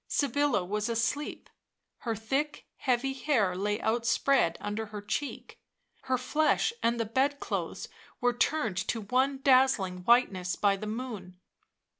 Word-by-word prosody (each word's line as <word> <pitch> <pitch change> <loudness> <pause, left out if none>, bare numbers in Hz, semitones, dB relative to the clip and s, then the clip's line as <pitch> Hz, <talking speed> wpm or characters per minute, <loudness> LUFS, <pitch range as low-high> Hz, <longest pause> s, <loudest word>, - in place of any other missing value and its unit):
Sybilla 285 -7 +1
was 210 +4 -2
asleep; 230 +6 -2 0.5
her 230 -3 -2
thick, 270 +8 -2
heavy 260 +1 0
hair 245 -9 +1
lay 205 +3 -1
outspread 235 -4 +2
under 210 +2 -4
her 210 0 -7
cheek; 215 +8 -5 0.5
her 260 0 +1
flesh 310 - +1
and 235 0 +1
the 230 - 0
bed 270 +6 +1
clothes - - -4 0.3
were 245 0 +2
turned 240 -5 0
to 230 - -1
one 260 +6 0
dazzling 255 -9 +4
whiteness 185 -4 +2
by 200 -1 +2
the 210 +2 -6
moon. 215 -6 -6
235 Hz, 135 wpm, -29 LUFS, 205-270 Hz, 0.5 s, dazzling